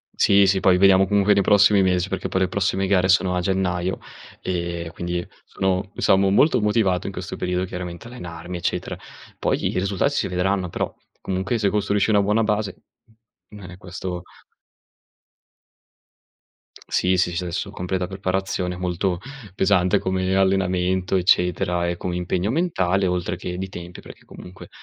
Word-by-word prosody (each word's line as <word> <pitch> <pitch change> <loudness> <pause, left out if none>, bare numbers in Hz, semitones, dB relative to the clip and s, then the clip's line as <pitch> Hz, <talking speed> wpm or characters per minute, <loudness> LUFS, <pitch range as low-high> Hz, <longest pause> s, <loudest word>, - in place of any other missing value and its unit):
Sì, 100 0 +5
sì. 95 0 +2
Poi 95 -1 +4
vediamo, 95 0 +5
comunque, 100 +1 +3
nei 100 - +3
prossimi 100 0 +5
mes 90 -1 +1
perché 95 0 -3
poi 95 - -1
le 95 - +3
prossime 95 +1 0
gare 95 -1 +2
sono 95 -1 +3
a 90 - 0
gennaio, 90 0 -1 0.4
ehm, 85 -2 -3
quindi 85 +1 -4 0.2
sono 95 0 -1
diciamo 95 0 +3
molto 115 +5 +4
motivato 105 -4 +1
in - - -5
questo - - -6
periodo, 90 0 -1
chiaramente, 90 +2 -7
allenarmi, 90 -7 -7
eccetera. 85 - -3 0.4
Poi, - - 0
i - - 0
risulta 100 +6 0
si 145 - -1
vedranno 90 0 -1
però, - - -3 0.3
comunque, 95 +4 -2
se 105 -3 +1
costruisci 105 +1 +1
una 105 - +4
buona 105 +3 +2
base 105 -2 -1 0.8
non 100 -4 -10
è 90 - -11
questo 90 -1 -6 2.6
Sì, 95 0 +1
sì, 90 -1 +1
sci, 85 +2 -2
adesso 90 +3 -3
completa 90 -1 -3
preparazione, 95 -1 -2
molto 90 0 -1 0.4
pesante 95 -2 +3
come 95 0 -1
allenamento 95 -1 +1
eccetera 90 -1 +2
e 85 - -2
come 90 0 -4
impegno 90 +2 -1
mentale, 100 - +1
oltre 90 0 -1
che 90 -1 -5
di 95 +1 -4
tempi 90 -2 -9
perché, - - -14
comunque, 90 +1 -12
95 Hz, 155 wpm, -22 LUFS, 90-100 Hz, 2.6 s, Sì